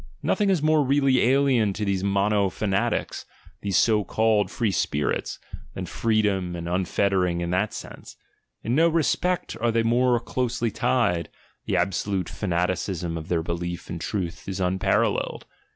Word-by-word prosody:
Nothing 205 -1 +1
is 180 -6 +1
more 155 -1 +4
really 135 -1 +3
alien 130 -5 +3
to 105 +1 -3
these 100 -2 0
"monofanatics," 100 0 0 0.4
these 100 -3 0
so 110 -2 +3
called 110 -2 +1
"free 115 -4 -1
spir 75 -5 0
its," - - -3 0.4
than - - -4
freedom 100 -5 0
and 85 0 -5
unfettering 90 0 +1
in 85 0 -2
that 95 +4 +1
sense; - - -9 0.5
in 115 - -1
no 165 +5 +4 0.3
pect 180 0 -1
are 120 0 +2
they 115 0 +1
more 120 +1 +3
closely 120 -1 -2
tied, 90 -8 0 0.4
the - - +1
absolute 95 -1 -1
fanaticism 90 -2 -2
of 80 -1 -6
their 85 -2 0
belief 85 +1 -4
in 85 - -4
truth 90 0 -4
is 95 0 -4
unparalleled. 95 0 0
100 Hz, 150 wpm, -25 LUFS, 90-120 Hz, 0.5 s, more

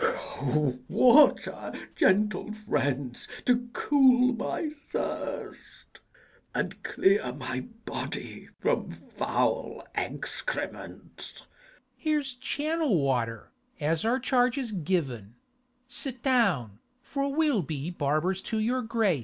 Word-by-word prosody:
O, 135 -1 0
water, 280 +4 +5 0.2
gentle 210 +2 +2
friends, 140 - -2 0.2
to 245 -1 +2
cool 255 -2 +4
my 270 +5 -2 0.2
thirst, - - -5 0.6
And - - -2
clear 190 -10 +2
my 130 0 -4 0.3
body - - -5
from - - 0 0.3
foul - - 0
excrements! - - -5
Mat. - - -22 0.5
Here's 300 -4 -1
channel 290 - 0
water, 120 -5 -1 0.3
as 155 +1 0
our 235 +3 +2
charge 250 -1 +2
is 255 -5 -2
given: 140 - -2 0.5
Sit 250 0 -4
down, 180 - +2 0.2
for 280 -1 -2
we'll 295 -7 +2
be 150 +1 -4
barbers 160 +4 0
to 220 - -3
your 240 +4 +1
grace. 220 - +1
215 Hz, 105 wpm, -28 LUFS, -, 0.6 s, water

